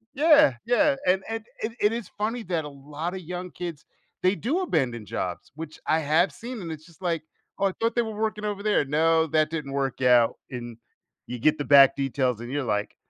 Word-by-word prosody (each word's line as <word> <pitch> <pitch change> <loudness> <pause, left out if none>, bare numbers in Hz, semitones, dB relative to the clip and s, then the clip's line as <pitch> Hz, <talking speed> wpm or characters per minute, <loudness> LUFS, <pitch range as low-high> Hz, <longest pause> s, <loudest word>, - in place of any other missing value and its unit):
Yeah. 295 - +6
Yeah, 280 +4 +3
and 190 +1 +3
and 225 -1 -4 0.2
it 220 - -2
it 210 - +3
is 230 -5 -5
funny 225 +3 -2
that 170 -5 -2
a - - -6
lotta 150 +6 -6
young 180 +1 -6
kids, 170 -4 -7 0.4
they 185 +2 +3
do 275 - -1
abandon 120 - -1
jobs, 90 -3 -4
which 155 0 -8
I 160 - +3
have 155 +5 +2
seen, 235 -2 -7
and 165 - -5
it's 155 0 -8
just 170 +1 -20
like, 170 -3 -1 0.4
"Oh, 200 - +2
I - - -1
thought 230 0 +1
they 240 - +3
were 220 -1 -5
working 215 0 -2
over 205 -1 -3
there." 210 -8 +2
No, 160 +3 +3
that 155 0 +2
didn't 150 -4 -4
work 135 -1 -2
out, 125 -2 +5 0.2
and 120 -2 -7 0.5
you 125 - -6
get 155 +6 +3
the 145 - -3
back 135 -1 +7
details 135 -4 0
and 120 +1 -7
you're 145 0 -1
like, 105 -4 -2
160 Hz, 215 wpm, -26 LUFS, 140-210 Hz, 0.5 s, back